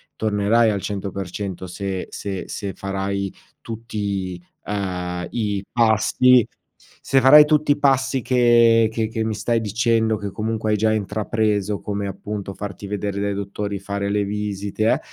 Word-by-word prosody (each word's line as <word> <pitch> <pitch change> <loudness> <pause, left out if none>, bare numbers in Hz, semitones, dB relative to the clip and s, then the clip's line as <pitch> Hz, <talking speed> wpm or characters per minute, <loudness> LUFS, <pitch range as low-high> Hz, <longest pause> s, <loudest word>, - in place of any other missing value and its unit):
tornerai 110 +2 +2
al 100 -2 -2
100% 95 -2 -5
se 95 +1 -4
se 95 -2 -5
se 100 -2 -5
farai 100 0 -3 0.3
tutti, 100 -5 -4 0.2
ehm, 90 -3 -3
i 105 -4 -2
passi; 120 +2 +4 0.6
se 135 - +2
farai 150 +4 +9
tutti 150 -1 +2
passi 135 -2 +2
che 120 -2 +5
che 110 -1 -1
che 110 0 -2
mi 110 -1 -2
stai 115 +2 0
dicendo, 110 +1 +1
che 100 -1 -5
comunque 110 +1 -2
hai 105 - +2
già 110 +1 +2
intrapreso, 105 -1 -1
come 100 -1 -3
appunto 100 0 -6
farti 100 0 -7
vedere 100 0 -3
dai 100 0 -1
dottori, 100 0 -4
fare 100 +1 -3
le 105 0 +1
visite 105 0 -3
eh, - - 0
105 Hz, 145 wpm, -22 LUFS, 100-115 Hz, 0.6 s, farai